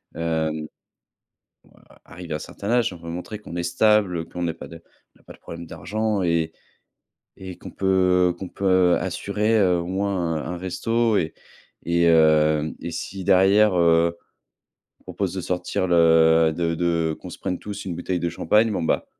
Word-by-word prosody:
Hem, 80 -1 -2 1.1
a - - -22
arrivé 85 -2 -9
à - - 0
un - - -5
certain 100 +6 -7
âge, 120 -5 +2
on 85 - -11
veut 85 0 -8
montrer 90 +5 -6
qu'on 85 -5 -9
est 85 - -1
stable, 105 +1 +2
heu, 80 - -3
qu'on 90 - -7
n'a 85 -2 -1
pas - - -10
de 85 - -11
on 85 - -32
n'a - - -27
pas - - -13
de - - -18
problème 85 0 -9
d'argent 105 +5 -2
et 85 -2 0 0.9
et 95 -1 -9
qu'on - - -10
peut, 90 -2 +2
heu, - - -5
qu'on 95 -1 -7
peut 95 -2 +2
assurer, 100 +5 -1
heu, 90 -3 +3
au 85 - -4
moins 95 -3 -1
un 80 +3 -5
un - - -6
resto 115 +6 0
et 80 - -1 0.5
et 85 0 +2
heu, 80 -1 +4
et 85 - -5
si 95 +3 -6
derrière, 100 +1 +4
heu, 85 0 +3 0.8
on - - -30
propose 95 -4 -3
de 95 - -3
sortir 90 +1 -2
le 80 -1 +5
de 85 -1 0
de 85 -2 0
qu'on - - -9
se - - -10
prenne 90 - -3
tous 100 -1 -8
une 90 - -3
bouteille 90 +1 -3
de 85 - -1
champagne, 105 +7 +2
bon, 95 - -2
bah 80 - 0
90 Hz, 195 wpm, -23 LUFS, 85-95 Hz, 1.1 s, le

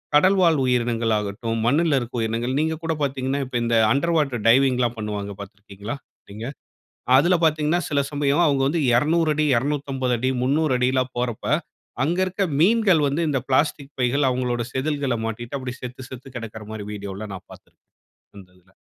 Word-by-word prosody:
கடல்வாழ் 175 -1 +4
உயிரினங்களாகட்டும், 115 -2 0
மண்ணுல 145 +3 +3
இருக்கிற 120 0 -5
உயிரினங்கள். 115 +3 -1
நீங்க 160 0 -1
கூட 165 - 0
பார்த்தீங்கன்னா 135 0 -1
இப்ப 125 -1 -3
இந்த 115 0 +1 0.2
அண்டர் 165 +7 +1
வாட்டர் 135 -8 0
டைவிங்ல்லாம் 125 -2 +3
பண்ணுவாங்க 105 -1 -4
பார்த்திருக்கீங்களா 100 +4 -8 0.4
நீங்க? 110 +3 -7 0.7
அதில 170 +7 +4
பார்த்தீங்கன்னா, 155 +1 +2
சில 145 -1 +2
சமயம் 145 +2 +1
அவுங்க 140 -2 +2
வந்து 165 +3 0 0.2
200 155 +2 +2
250 130 -2 -1
300 130 -2 +2
ல்லாம் 130 0 0
போறப்ப 120 -3 -3 0.6
அங்க 165 +6 0
இருக்க 190 +2 -1 0.2
மீன்கள் 195 -3 +4
வந்து 150 +5 -1
இந்த 140 -2 +1
பிளாஸ்டிக் 140 +1 0
பைகள் 130 +3 +2
அவுங்களோட 125 -1 -1
செதில்கள்ள 140 -2 -1
மாட்டிக்கிட்டு 120 +4 -5
அப்டி 125 -1 -5
செத்து 125 +1 -7
செத்து 130 +1 -9
கிடக்கிற 110 -2 -7
மாரி 105 -2 -6
வீடியோல்லாம் 100 0 -6
நான் 95 - -11
பார்த்திருக்கிறேன். - - -18 0.5
அந்த 95 -2 -13
இதில. 95 +2 -29
130 Hz, 150 wpm, -23 LUFS, 115-150 Hz, 0.7 s, கடல்வாழ்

